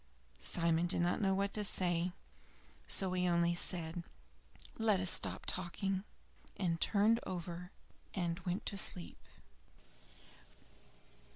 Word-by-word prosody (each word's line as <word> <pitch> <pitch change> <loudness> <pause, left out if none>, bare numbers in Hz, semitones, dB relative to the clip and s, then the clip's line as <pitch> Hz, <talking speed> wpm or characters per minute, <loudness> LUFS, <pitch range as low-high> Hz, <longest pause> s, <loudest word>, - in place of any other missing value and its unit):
Simon 170 - +2
did 175 - 0
not 175 +3 0
know 195 -1 +2
what 200 +1 -1
to 210 - -2
say; 180 -2 +2 0.8
so 190 -1 +3
he 180 0 +1
only 170 0 +2
said, 170 -1 -2 0.8
"Let 215 -4 +3
us 185 -1 +3
stop - - +1
talking," 190 +2 -2 0.5
and 170 -3 -1
turned 220 +2 +3
over 175 0 -6 0.5
and 175 -2 -2
went 180 +1 -3
to 200 - -2
sleep. 180 -2 +2
180 Hz, 115 wpm, -35 LUFS, 170-195 Hz, 0.8 s, so